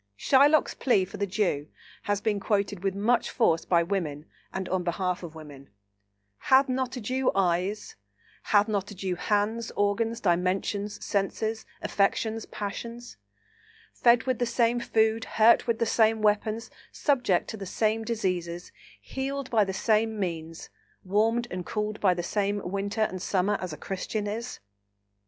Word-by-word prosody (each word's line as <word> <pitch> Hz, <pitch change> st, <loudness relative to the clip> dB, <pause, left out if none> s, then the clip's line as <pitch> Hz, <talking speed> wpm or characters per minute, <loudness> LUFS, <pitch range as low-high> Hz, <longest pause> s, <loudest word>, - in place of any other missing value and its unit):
Shylock's 285 Hz, -, +4 dB
plea 205 Hz, -8 st, +2 dB
for 190 Hz, -, -10 dB
the 200 Hz, -, -1 dB
Jew 180 Hz, -7 st, 0 dB, 0.4 s
has 205 Hz, 0 st, +1 dB
been 210 Hz, -2 st, 0 dB
quoted 200 Hz, -2 st, -1 dB
with 195 Hz, -1 st, 0 dB
much 230 Hz, +5 st, +1 dB
force 165 Hz, -9 st, +2 dB
by 170 Hz, -2 st, +3 dB
women 165 Hz, -5 st, -3 dB, 0.3 s
and 190 Hz, -1 st, -4 dB
on 185 Hz, 0 st, 0 dB
behalf 180 Hz, +1 st, -1 dB
of 165 Hz, -3 st, -9 dB
women: 145 Hz, -3 st, -11 dB, 0.7 s
"Hath 270 Hz, +1 st, +4 dB
not 260 Hz, 0 st, -2 dB
a -, -, -5 dB
Jew 255 Hz, +4 st, 0 dB
eyes? 190 Hz, +2 st, 0 dB, 0.5 s
Hath 205 Hz, 0 st, +4 dB
not 205 Hz, -2 st, -1 dB
a 205 Hz, -, -9 dB
Jew 185 Hz, 0 st, -2 dB
hands, 210 Hz, +5 st, 0 dB
organs, 225 Hz, +3 st, 0 dB
dimensions, 190 Hz, +3 st, -1 dB
senses, 220 Hz, +2 st, -2 dB, 0.2 s
affections, 220 Hz, +2 st, 0 dB
passions? 235 Hz, +4 st, -6 dB, 0.8 s
fed 235 Hz, -1 st, +4 dB
with 255 Hz, -3 st, -1 dB
the 245 Hz, -, +1 dB
same 235 Hz, 0 st, +2 dB
food, 220 Hz, -1 st, +1 dB
hurt 230 Hz, +2 st, +6 dB
with 230 Hz, -1 st, +1 dB
the 230 Hz, -, +1 dB
same 220 Hz, -1 st, +2 dB
weapons, 215 Hz, +2 st, +1 dB, 0.2 s
subject 245 Hz, -, +1 dB
to 220 Hz, -, -5 dB
the 195 Hz, -2 st, -7 dB
same 220 Hz, +3 st, 0 dB
diseases, 180 Hz, -7 st, -3 dB, 0.3 s
healed 275 Hz, 0 st, -4 dB
by 220 Hz, -3 st, +4 dB
the 190 Hz, -, -2 dB
same 220 Hz, +2 st, +1 dB
means, 165 Hz, -3 st, -5 dB, 0.3 s
warmed 225 Hz, +5 st, +1 dB
and 180 Hz, 0 st, -4 dB
cooled 210 Hz, 0 st, -3 dB
by 185 Hz, -3 st, +3 dB
the 175 Hz, -, -3 dB
same 205 Hz, +2 st, 0 dB
winter 200 Hz, +3 st, -2 dB
and 185 Hz, -4 st, 0 dB
summer, 195 Hz, +2 st, +1 dB
as 185 Hz, -2 st, -4 dB
a 150 Hz, -, -7 dB
Christian 205 Hz, +2 st, -4 dB
is? 230 Hz, +4 st, -5 dB
205 Hz, 155 wpm, -27 LUFS, 185-225 Hz, 0.8 s, hurt